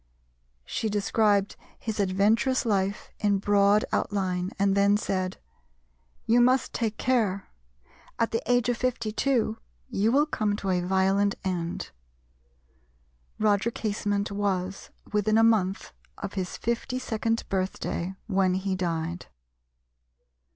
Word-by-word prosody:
She 220 - -2
described 205 -1 +2 0.2
his 220 -2 -4
adventurous 210 +7 +2
life 200 -2 -1
in 205 -2 +2
broad 200 +1 +3
outline, 185 -3 -1
and 195 0 +2
then 200 +1 +4
said, 185 -3 -2 0.9
"You 235 +2 +4
must 255 +2 +3
take 225 -2 -2
care: 220 -7 0 0.7
at 230 - +1
the 225 - 0
age 245 -1 +3
of 245 -1 +1
52 240 - 0 0.3
you 215 +3 +2
will 285 +4 +4
come 215 -9 -1
to 195 -2 -2
a 180 -1 +1
violent 195 +2 +2
end." 175 -3 -3 1.5
Roger 215 +1 +2
Casement 205 -2 -2
was 195 -2 -2 0.2
within 210 +1 +2
a 225 - +5
month 200 -4 +1 0.2
of 200 0 -6
his 185 -2 -3
fifty 235 +2 -2
second 225 -2 -1
birthday 190 -1 -2
when 190 -3 +2
he 190 0 -1
died. 170 -1 -3
205 Hz, 120 wpm, -27 LUFS, 190-225 Hz, 1.5 s, a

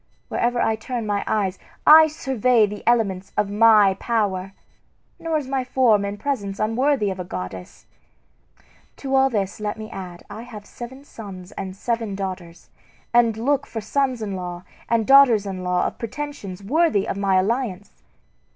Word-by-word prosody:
Wherever 240 0 0
I 220 - +2
turn 230 +1 -5
my 205 -1 -1
eyes 195 -3 -1 0.3
I 315 +1 +9
survey 255 -6 +2
the 205 0 -7
elements 200 -6 +1
of 205 -1 +1
my 210 -2 +6
power; 195 -5 -1 0.7
nor 325 -1 -1
is 290 -4 -4
my 265 -1 -1
form 250 -5 +3
and 200 +1 -5
presence 205 -7 -3
unworthy 225 0 +1
of 190 - -6
a - - -3
goddess. 90 - -8 1.1
To 270 -1 -5
all 270 0 +4
this 200 -5 -2
let 210 0 -3
me 215 0 -8
add 180 -2 -8
I 210 +2 -8
have 220 -4 -10
seven 260 +3 -10
sons 195 -8 -10
and 190 -2 -6
seven 225 -1 -2
daughters, 185 -3 -7 0.4
and 235 -2 +4
look 280 +4 0
for 225 - -5
sons 255 +1 -1
in 200 -2 -4
law 180 -1 -6 0.3
and 230 -2 +2
daughters 265 -6 +6
in 190 -2 -5
law 180 0 +1
of - - -4
pretensions 230 -7 -6
worthy 295 - +2
of - - -2
my 195 -1 +1
alliance. 205 0 -1
215 Hz, 165 wpm, -22 LUFS, 195-250 Hz, 1.1 s, I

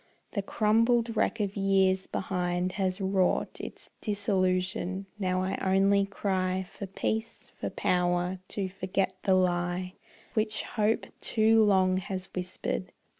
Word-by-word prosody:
The 200 - -1
crumbled 230 +3 +2
wreck 230 - +1
of 200 -2 -1
years 190 -1 +2
behind 180 -1 -1
has 185 0 -1
wrought 190 -1 +1
Its - - -8
disillusion; 190 -2 0
now 185 -1 0
I 190 - -2
only 195 +1 +3
cry 190 -2 -1
For 200 - -7
peace, 220 +4 -3
for - - -4
power 180 +1 0
to 195 -2 -2
forget 185 0 -1
the 190 - +3
lie 180 0 0 0.4
Which 215 -2 0
hope 215 0 0
too 220 0 +4
long 190 -3 +4
has 190 0 -4
whispered. 180 0 -3
190 Hz, 125 wpm, -29 LUFS, 185-205 Hz, 0.4 s, too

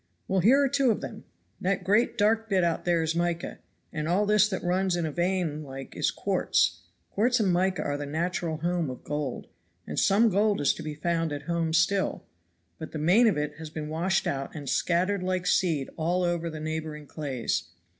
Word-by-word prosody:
"Well, 190 0 +1
here 235 +10 +5
are - - +3
two 275 -1 +2
of 220 - +1
them. - - -8 0.3
That 190 +1 0
great 210 +5 +2
dark 225 +2 +2
bit 190 -3 +2
out 170 -1 0
there 170 -2 +2
is 160 0 0
mica, 170 0 -2 0.3
and 155 -2 -3
all 185 +5 +2
this 210 0 +4
that 190 - -3
runs 185 +1 +1
in 170 -2 -1
a 155 - -2
vein 175 -2 -1
like 135 -2 -9
is - - +1
quartz. 85 -2 +1 0.3
Quartz 245 +4 +2
and 195 -5 +2
mica 185 +2 +1
are 145 0 -2
the 145 0 -5
natural 165 +1 -2
home 170 -1 -1
of 125 - -8
gold; 145 -3 -3 0.4
and - - -3
some 215 +4 +4
gold 205 +1 +2
is 145 - +3
to - - -9
be 155 -1 -5
found 165 +1 -1
at 145 0 -4
home 165 0 -1
still, 170 +4 +1 0.6
but 160 - -8
the - - -3
main 180 +10 +4
of 205 - +2
it 150 0 -3
has 160 -1 -7
been 150 -1 -6
washed 175 +5 0
out 135 +2 -3
and 145 -3 -7
scattered 180 +7 +1
like 185 0 -1
seed 165 -6 +1
all 175 +3 0
over 170 -1 -1
the 155 -1 -7
neighboring 155 -1 -4
clays. 135 - -3
170 Hz, 205 wpm, -27 LUFS, 155-190 Hz, 0.6 s, here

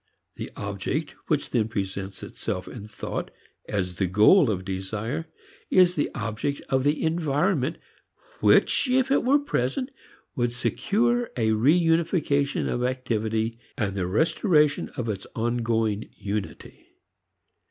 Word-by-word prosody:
The - - -6
"object" 100 - -3 0.2
which 150 -2 0
then 115 -4 +2
presents 100 -2 -4
itself 90 0 -4
in 105 -4 -8
thought 110 - -5 0.4
as 90 -3 -2
the 95 - +1
goal 110 - +6
of 95 -3 -2
desire 110 - -3 0.4
is 180 -1 +5
the 150 - 0
object 115 +5 -2
of 130 -1 +2
the 145 +2 +1
environment 160 -1 +1 0.6
which, - - +4
if 260 +1 +2
it 275 - +3
were 270 +4 +5
present, 255 - -1 0.4
would 120 -3 0
secure 235 - +1
a 110 -2 +2
re 120 +9 +4
unification 165 -4 +1
of 120 - -1
activity 115 -3 -1 0.2
and 105 -6 -1
the 95 -3 -1
restoration 150 - +2
of 125 -3 -2
its 100 -3 -4
ongoing 115 -2 0
unity. 105 0 -5
120 Hz, 130 wpm, -26 LUFS, 105-160 Hz, 0.6 s, goal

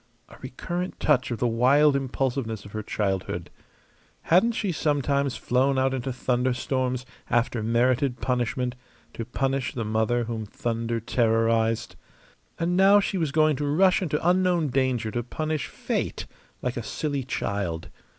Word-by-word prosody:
A - - -14
recurrent 175 +8 -5
touch 135 -4 +2
of 120 - -2
the 120 - +1
wild 135 +5 +4
impulsiveness 130 -5 -2
of 100 - -11
her 110 - -4
childhood. 95 -3 -2 0.7
Hadn't 190 +8 +4
she 205 -3 -1
sometimes 140 -3 0
flown 130 +2 +1
out 130 0 +2
into 130 0 -2
thunderstorms, 125 +1 -1 0.2
after 120 -1 +1
merited 120 +3 +1
punishment, 125 0 -1 0.4
to 115 - -5
punish 135 +1 -1
the 115 -3 -2
mother 110 +3 +1
whom 115 -1 -4
thunder 115 +1 -2
terrorized? 115 0 +1 0.6
And 170 +2 0
now 195 +2 +6
she 195 -1 -1
was 160 -4 0
going 155 0 +3
to 145 +1 -2
rush 185 +7 +4
into 160 -2 -1
unknown 180 -3 +3
danger 125 -4 0
to 120 - -1
punish 155 +4 -3
Fate - - -3 0.4
like 125 0 -2
a - - -1
silly 140 +4 -3
child! 100 -9 -3
130 Hz, 145 wpm, -26 LUFS, 115-145 Hz, 0.7 s, now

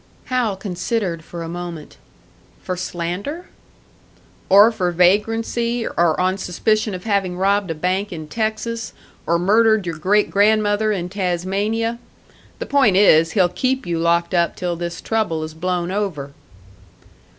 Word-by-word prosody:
Hal 235 -6 +1
considered 185 -2 -3
for 170 +1 -7
a - - -6
moment. 170 -2 -7 0.7
"For 185 - -3
slander?" 180 - -4 1.0
"Or 205 +4 +7
for 180 -5 -1
vagrancy; 225 +6 +1
or 170 -2 +1
on 185 +1 +1
suspicion 215 +3 0
of 180 - -8
having 195 -4 -1
robbed 200 0 +1
a 165 - -2
bank 185 +5 -1
in 155 -3 -7
Texas, 220 +4 -3 0.3
or 170 +1 +3
murdered 215 +3 +3
your 165 -2 -4
great 205 +5 +2
grandmother 210 +1 +2
in 180 -4 -2
Tasmania. 200 +5 -1 0.6
The - - -5
point 265 -9 +3
is, 165 -5 +5
he'll 185 -4 +4
keep 260 +7 -1
you 170 -2 -2
locked 170 +1 +1
up 170 -1 +1
till 175 -1 -3
this 170 0 -5
trouble 210 -8 -1
has 155 0 -7
blown 175 +1 -2
over." 185 -9 -3
190 Hz, 140 wpm, -20 LUFS, 175-215 Hz, 1.0 s, Or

